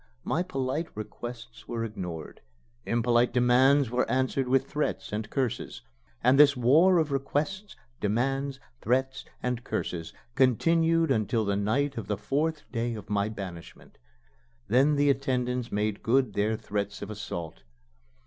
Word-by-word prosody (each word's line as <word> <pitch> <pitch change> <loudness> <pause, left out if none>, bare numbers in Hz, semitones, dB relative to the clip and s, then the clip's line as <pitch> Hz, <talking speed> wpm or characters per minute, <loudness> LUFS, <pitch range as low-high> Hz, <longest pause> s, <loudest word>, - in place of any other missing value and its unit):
My 165 - 0
polite 140 -1 -2
requests 115 +2 -8
were 115 -1 -3
ignored; 90 -8 -6 0.5
impolite 120 +1 +2
demands 125 +2 +4
were 125 +1 0
answered 130 0 0
with 135 +1 +3
threats 150 -7 -3
and 110 +1 -3
curses. 130 -4 -3 0.4
And 135 +2 +5
this 145 -2 +7
war 160 +10 +5
of 155 -3 +1
requests, 150 +9 -2 0.2
demands, 135 +6 -1 0.2
threats, 130 +3 0 0.2
and 125 -1 -2
curses 80 -8 -3 0.2
continued 165 +6 +3
until 110 +1 +1
the 100 0 0
night 130 +7 0
of 100 - -7
the 105 -1 -1
fourth 150 +9 -1
day 115 -1 -2
of 105 -1 -9
my 100 0 +1
banishment. 95 -6 -9 0.7
Then 135 +8 +4
the 145 0 +4
attendants 125 -2 -1
made 105 0 -1
good 125 -2 +2
their 105 +2 0
threats 105 -1 -4
of 105 - -6
assault. 85 -6 -6
125 Hz, 140 wpm, -28 LUFS, 110-140 Hz, 0.7 s, this